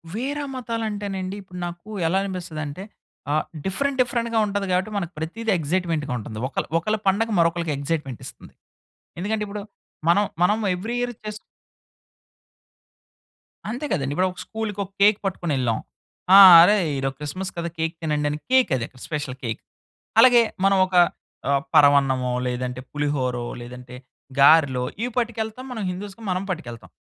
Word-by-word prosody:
వేరే 285 +5 -2
మతాలు 230 -2 -3
అంటే 205 0 -5
నండి. 185 +1 -4
ఇప్పుడు 180 -1 -10
నాకు 175 +4 -8 0.2
ఎలా 185 +4 +1
అనిపిస్తది 180 -5 -5
అంటే 155 +7 -7 0.5
ఆహ్, 155 - +1 0.2
డిఫరెంట్, 275 +8 -1
డిఫరెంట్‌‌గా 235 -2 0
ఉంటది 200 -1 -2
కాబట్టి 185 +4 0
మనకు 175 -3 -3
ప్రతిది 220 +8 -3
ఎక్సైట్మెంట్‌‌గా 160 -3 -1
ఉంటుంది. 110 0 -7
ఒకళ్ళ 135 - -3
ఒకళ్ళ 215 +6 0
పండగ 220 +4 +2
మరొకళ్ళకి 170 -1 +1
ఎక్సైట్మెంటిస్తుంది. 140 -3 -5 0.7
ఎందుకంటే, 210 +3 -1
ఇప్పుడు 200 0 -6 0.5
మనం 205 +4 +5 0.2
మనం 210 +5 +3 0.2
ఏవ్రీ 220 +7 -4
ఇయర్ 245 0 -1
చేసు 215 0 -5 2.3
అంతే 245 +7 -4
కదండీ. 140 -5 -1
ఇప్పుడు 185 +1 +2
ఒక 180 - -13
స్కూల్‌కి 220 -2 -5
ఒక 190 - -19
కేక్ 205 0 +6
పట్టుకొనెళ్ళాం. 140 - -1 0.6
ఆ! - - +11 0.2
అరే! 205 +5 +6 0.2
ఈరోజు 135 0 -2
క్రిస్మస్ 185 +6 -5
కదా 170 0 -2
కేక్ 160 +1 -1
తినండి 150 -2 0
అని 150 - -3
కేక్ 260 -1 +4
అది 115 - -4 0.2
స్పెషల్ 145 -4 -4
కేక్. 110 -2 -3 0.6
అలాగే 240 0 +8 0.2
మనం 195 0 +4
ఒక 185 - -9 0.5
ఆ! - - +2 0.2
పరవన్నమో, 135 -3 +4 0.2
లేదంటే 125 0 -3
పులిహోరో, 135 -5 -1 0.2
లేదంటే 125 +1 -10 0.4
గారెలో, 140 -3 +5 0.2
ఇవి 245 +2 -1
పట్టుకెళ్తాం. 230 +1 -3
మనం 225 -3 -4
హిందుస్‌కి 200 +4 -7
మనం 185 +1 -1
పట్టుకెళ్తాం. 120 -10 -6
180 Hz, 145 wpm, -23 LUFS, 145-215 Hz, 2.3 s, ఆ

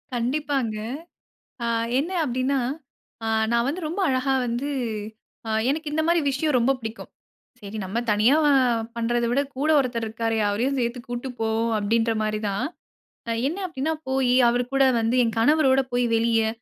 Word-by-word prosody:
கண்டிப்பாங்க. 260 -1 -1 0.9
ஆ - - 0 0.3
என்ன 325 +6 -2
அப்படின்னா, 260 +1 0 0.7
ஆ - - -1 0.2
நான் 235 0 +2
வந்து 320 +7 -2
ரொம்ப 340 +6 -4
அழகா 260 +1 +1
வந்து 240 +5 -2 1.0
எனக்கு 305 +1 -2
இந்த 310 +1 +1
மாரி 340 0 +4
விஷயம் 280 +1 0
ரொம்ப 240 +3 +3
பிடிக்கும். 225 -1 -7 0.5
சரி 205 +1 -7
நம்ம 195 +5 -4
தனியா 215 +7 +4 0.6
பண்றதா 235 0 0
விட 270 +3 +2 0.2
கூட 295 +3 0
ஒருத்தர் 240 -4 -1
இருக்காரு 225 +1 -2
அவரையும் 245 +7 0
சேர்த்து 240 +1 -1
கூட்டிட்டு 245 +2 -4
போவோம். 225 +1 0
அப்படிங்கிற 225 +2 +1
மாரி 215 0 -1
தான். 200 +6 -1 0.8
என்ன 325 +6 -3
அப்படின்னா 320 -1 -2
போய் 265 -1 +1 0.2
அவர் 245 +1 +2
கூட 275 0 +4 0.2
வந்து 225 +2 +1
என் 230 -1 0
கணவரோடு 270 +1 +4
போய் 245 0 +2
வெளியே, 225 -1 +2
245 Hz, 150 wpm, -24 LUFS, 230-275 Hz, 1.0 s, மாரி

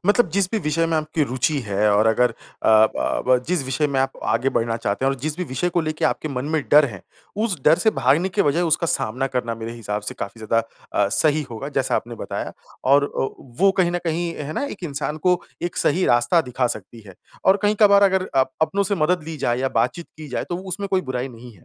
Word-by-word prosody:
मतलब 205 0 +4
जिस 195 +2 +1
भी 225 - 0
विषय 165 -1 0
में 165 -1 0
आपकी 155 0 -1
रूचि 130 +4 0
है 105 +1 +2
और 105 +2 +3
अगर 120 +2 +3
अ, - - -12 0.6
ब - - -1
ब 130 0 +5
जिस 175 -6 0
विषय 130 +3 0
में 140 -2 -1
आप 135 0 0
आगे 120 +4 +1
बढ़ना 115 -2 0
चाहते 105 +2 -2
हैं 135 - +3
और - - -1
जिस 150 +2 -3
भी 180 - -1
विषय 130 +4 -2
को 175 - +1
लेके 155 -1 -2
आपके 155 - 0
मन 130 -2 -3
में 155 - +1
डर 150 +1 +7
है, 100 -9 -6 0.3
उस 215 -4 -1
डर 155 - +7
से 220 - +3
भागने 175 -2 +2
की 200 +2 +1
वजाय 150 +4 +1
उसका 170 0 +1
सामना 130 -3 -1
करना 125 -3 -2
मेरे 115 0 -6
हिसाब 105 -3 -4
से - - -5
काफ़ी 100 +3 -6
ज़्यादा 115 +2 +2 0.5
अ, - - 0
सही 150 +7 +2
होगा, 120 +5 -5
जैसा 135 -3 0
आपने 120 0 -4
बताया। - - -5 0.4
और 140 +1 +6
ओ 135 - -2 0.3
वो 195 0 +6
कहीं 180 -2 +3
न 175 - -1
कहीं 170 +1 -1
है 150 +1 -5
ना, 280 - -2
एक 210 -9 -7
इंसान 150 0 -3
को 180 +2 +2 0.2
एक 175 - -3
सही 180 +5 +2
रास्ता 120 +7 +3
दिखा 125 -1 -1
सकती 115 -1 -6
है, 95 - -12 0.3
और 190 - +6
कहीं-कभार 205 -1 +5
अगर 190 -1 +3
अप 130 0 +3
अपनों 200 +5 +1
से 200 +1 0
मदद 175 0 +1
ली 160 0 -6
जाए 120 -4 0
या 135 - +1
बात-चीत 170 +5 -1
की 155 -1 -9
जाए 125 - -3
तो 175 - -2
उसमें 200 +2 -4
कोई 190 -1 +2
बुराई 130 -4 -3
नहीं 120 0 -12
है। 85 - -22
150 Hz, 245 wpm, -22 LUFS, 125-175 Hz, 0.6 s, डर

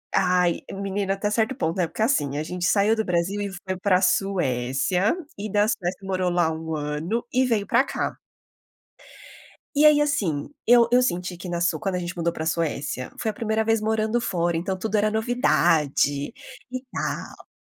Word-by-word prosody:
ai, 180 -2 +2
menina 195 0 -2
até 195 +1 -2
certo 225 +4 +1
ponto 165 - -2
né, 180 - +2
porque 165 - -7
assim, 145 - +1
a - - -2
gente 180 +2 -3
saiu 210 +3 +3
do 220 - -1
Brasil 180 +3 0
e 200 - -2
foi 190 0 -5
pra 185 -1 +3
Suécia, 180 - +1 0.2
e 205 +1 -5
da 205 +1 +3
Suécia 185 -5 -2
morou 185 -2 -1
lá 175 -2 +2
1 160 0 -4
ano 150 +9 -2
e 255 +1 +3
veio 220 -5 0
pra 240 +3 +4
cá. - - -3 1.6
E 295 +2 +5
aí 300 -1 +7
assim, 205 - 0 0.2
eu 235 0 +6
eu 250 - +5
senti 180 -7 -1
que 175 - -8
na 170 0 -2
Su 175 - +2
quando 195 -4 -2
a - - -1
gente 175 0 -5
mudou 170 0 0
pra 160 -1 -4
Suécia, 150 -5 -2
foi 220 - -1
a - - -2
primeira 220 0 -1
vez 225 -1 +1
morando 220 +1 +1
fora 170 -6 0
então 190 +3 -2
tudo 215 +2 -3
era 210 +1 +2
novidade, 165 - +1 0.4
e 255 0 -4
tal. - - -5
190 Hz, 185 wpm, -24 LUFS, 170-220 Hz, 1.6 s, aí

